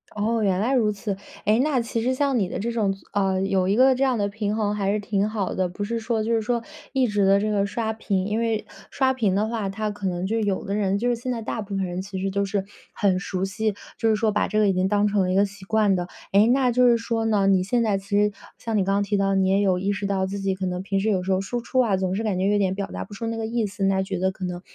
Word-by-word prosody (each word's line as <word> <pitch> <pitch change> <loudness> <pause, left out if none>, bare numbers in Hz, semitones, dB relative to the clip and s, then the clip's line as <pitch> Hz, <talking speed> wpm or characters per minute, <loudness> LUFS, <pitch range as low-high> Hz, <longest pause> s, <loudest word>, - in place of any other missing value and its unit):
哦， 220 +2 0
原 190 -2 +1
来 245 +6 +1
如 220 -5 +3
此。 205 -1 -4 0.3
哎， 215 +3 +3
那 290 -4 +1
其 230 0 -2
实 255 +2 +1
像 275 -2 +1
你 190 - +1
的 - - -4
这 235 +3 -2
种， 205 -4 0 0.2
啊， 195 -2 +1
有 190 -1 +1
一 200 - +2
个 260 +2 +6
这 265 +2 0
样 255 -3 +2
的 200 -1 +1
平 210 0 -2
衡， 210 -2 0
还 200 -1 0
是 210 - 0
挺 205 0 0
好 210 -4 -2
的。 185 -1 0
不 205 +3 -5
是 230 +2 -2
说 225 -1 -1
就 230 +1 0
是 225 - +2
说， 235 +1 -1 0.3
一 260 -2 +2
直 205 -2 +1
的 195 +1 +5
这 215 +1 -1
个 200 -1 +1
刷 220 +1 -2
屏。 195 -4 -1
因 210 +2 -1
为 225 -2 -1 0.2
刷 265 -1 +1
屏 210 -7 +1
的 210 +2 +1
话， 220 -4 -2
它 210 +1 -3
可 205 -2 -4
能 180 0 -2
就 225 +4 0
有 205 -3 -1
的 200 - -3
人 200 -1 +1
就 245 +3 0
是 240 - +2
现 250 +2 -4
在 230 -2 -3
大 225 - -3
部 200 -1 -5
分 195 -1 0
人 180 +1 -4
其 190 -1 -6
实 195 0 -1
都 200 +1 0
是， 195 0 -2 0.3
很 190 -3 +1
熟 190 -1 -2
悉， 210 +1 -2 0.2
就 225 - +2
是 215 - +4
说 215 0 +1
把 210 - +1
这 215 - -2
个 210 -1 +4
已 195 - +3
经 185 +1 +1
当 205 +1 +2
成 205 -1 +1
了 185 0 +1
一 - - +1
个 200 +1 +4
习 200 -1 -11
惯 210 -2 +2
的。 175 0 -2 0.2
哎， 205 +3 +5
那 255 -2 +3
就 250 +1 +4
是 235 -1 +5
说 230 -1 -2
呢， 210 -3 +2
你 190 -2 +4
现 235 +4 +1
在 205 -3 +1
其 195 - -16
实 205 0 +3 0.3
像 225 -2 -2
你 195 - +3
刚 195 +1 0
刚 205 - +2
提 205 0 -1
到， 195 0 +1
你 190 -1 +2
也 195 +1 +3
有 190 -2 +2
意 195 +2 -1
识 200 0 -3
到 190 -1 0
自 195 +1 -4
己 195 -1 -1
可 190 0 -4
能 180 0 -2
平 195 0 -1
时 215 +3 0
有 190 -3 +1
时 190 - -2
候 185 - +2
输 235 +5 -3
出 255 +2 -1
啊， 210 -6 +3
总 185 0 -1
是 220 - -2
感 200 -4 -1
觉 190 - +1
有 205 0 +3
点 190 -2 +1
表 200 0 -3
达 90 0 -6
不 - - -13
出 225 +3 -4
那 225 0 -3
个 225 - -2
意 230 -1 -1
思， 200 0 -5
那 195 0 +2
觉 190 0 -3
得 190 +1 +1
可 185 - -10
能 180 -1 -4
205 Hz, 335 characters per minute, -24 LUFS, 195-225 Hz, 0.3 s, 个